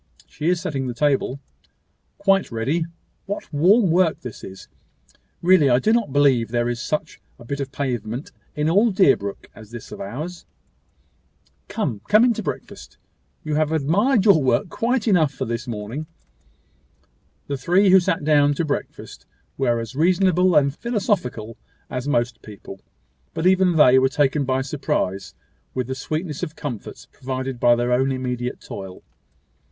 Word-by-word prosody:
She 155 +3 -3
is 180 -1 +1
setting 135 -5 -3
the 120 - -4
table." 140 0 0 0.8
"Quite 195 -4 +2
ready. 135 +9 -1 0.4
What 200 -5 -6
warm 185 +6 +4
work 175 -1 +2
this 125 -3 -9
is! 95 0 -10 0.8
Really 175 -5 +5
I 120 - +5
do 215 - +2
not 230 - +1
believe 135 -5 +3
there 120 0 0
is 120 -1 -3
such 155 +4 -4 0.2
a 120 - -14
bit 140 +4 -4
of 135 -1 -4
pavement 125 -2 -4 0.2
in 150 +1 0
all 205 +8 +4
Deerbrook 135 - +1
as 110 -2 -14
this 120 -1 -10
of - - -8
ours." 155 - -6 1.2
"Come 180 - -3
come 215 +3 +5
in 245 - +3
to - - -5
breakfast. - - -7 0.5
You 155 - -3
have 155 0 +1
admired 190 - +2
your 195 -7 +6
work 130 +4 +1
quite 240 +4 -1
enough 170 -9 +3
for 135 - -4
this 115 +1 -4
morning." 115 +7 -5 1.4
The 140 - -3
three 180 +9 +3
who 190 - +8
sat 165 -3 -1
down 145 -1 +3
to 165 - -1
breakfast 145 - -6 0.3
were 120 -3 +1
as 115 +1 -6
reasonable 180 +2 +3
and 140 -1 +3
philosophical 190 - -2 0.3
as 125 +1 -4
most 120 -4 0
people; 100 -2 -11 0.5
but 160 - -2
even 185 -1 +4
they 130 -4 +6
were 130 0 +3
taken 145 +1 +1
by 130 0 0
surprise 100 -9 -3 0.4
with 130 -1 -1
the 130 - -4
sweetness 155 +3 -4
of 155 - -5
comforts 125 -8 -7
provided 130 -1 -5
by 120 0 +5
their 120 +1 -1
own 130 +2 +2
immediate 125 -1 -3
toil. 95 -1 -9
140 Hz, 160 wpm, -22 LUFS, 125-175 Hz, 1.4 s, who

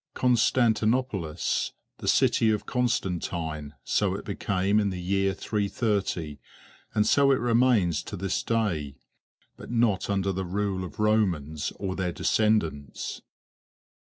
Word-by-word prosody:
Constantinopolis, 115 -6 +1 0.3
the - - -6
City 110 - +3
of 105 -1 0
Constantine; 85 - -2
so - - +1
it - - -7
became 100 +1 0
in 105 -1 +1
the 95 -1 -4
year 95 +2 +1
330, 100 - -1 0.6
and 105 - +3
so 140 -1 +4
it - - +5
remains 115 - +2
to 100 - -7
this 95 +1 -1
day, 90 -12 -1 0.6
but - - -10
not 115 -6 +1
under 100 -1 +1
the 95 0 -3
rule 95 +1 -2
of 90 - -9
Romans 90 -9 +1
or 95 -2 -4
their 90 -2 -1
descendants. 80 - 0
100 Hz, 125 wpm, -27 LUFS, 90-110 Hz, 0.6 s, it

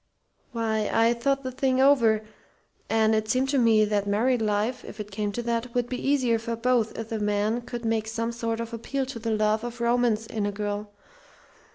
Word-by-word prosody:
"Why, 220 -3 -1
I 230 +1 +4
thought 275 +3 0
the 260 - -3
thing 260 0 0
over, 235 -6 +4 0.7
and 220 0 +3
it 215 0 0
seemed 255 +3 +1
to 275 -1 +2
me 225 -3 +5
that 205 -1 0
married 230 +4 +2
life 215 +4 0
if 215 - -10
it 210 0 -6
came 205 +1 -2
to 240 - -3
that 235 +1 -2
would 245 -1 +1
be 255 +2 -2
easier 250 -5 +2
for 230 +1 -3
both 230 -1 +1
if 225 0 -5
the 225 - -2
man 210 +3 0
could 240 -1 -7
make 225 -1 0
some 230 +1 -2
sort 230 -1 -3
of 230 0 -5
appeal 265 +4 -2
to 255 -3 -7
the 225 0 -3
love 215 0 +1
of 240 0 -6
romance 235 -2 +1
in 215 -2 -2
a - - -1
girl. 205 0 -4
230 Hz, 210 wpm, -26 LUFS, 215-245 Hz, 0.7 s, me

